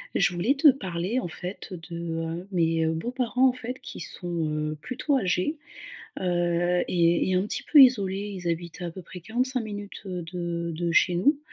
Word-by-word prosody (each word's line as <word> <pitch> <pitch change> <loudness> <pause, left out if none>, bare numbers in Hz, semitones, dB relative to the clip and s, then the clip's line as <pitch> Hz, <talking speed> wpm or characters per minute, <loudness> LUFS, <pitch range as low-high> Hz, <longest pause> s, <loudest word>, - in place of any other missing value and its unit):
Je 180 -1 +3
voulais 205 +11 +1
te 295 +2 +7
parler 190 -1 -2
en 240 - -3
fait 180 +4 -7 0.2
de, 170 -1 -6 0.3
heu, 170 +3 -5
mes 165 -2 +2
beaux-parents 245 +9 +1
en - - -1
fait 250 0 -6
qui - - -9
sont, 170 -1 -3
heu, 155 0 -2
plutôt 265 - 0
âgés, 190 - 0 0.6
heu, 175 0 +1
et 170 0 +2
et - - +1
un 185 - +3
petit 210 - -3
peu 300 - +8
isolés, 200 -5 +3
ils 175 - -4
habitent 170 +1 -4
à - - -3
à 170 - -4
peu 185 - -9
près 180 +1 -10
45 250 +7 -1
minutes, 205 -2 -7
heu, 180 -2 -4
de 170 -1 -3
de 170 +1 -1
chez 180 +1 +4
nous, 280 - +3
180 Hz, 195 wpm, -26 LUFS, 170-230 Hz, 0.6 s, peu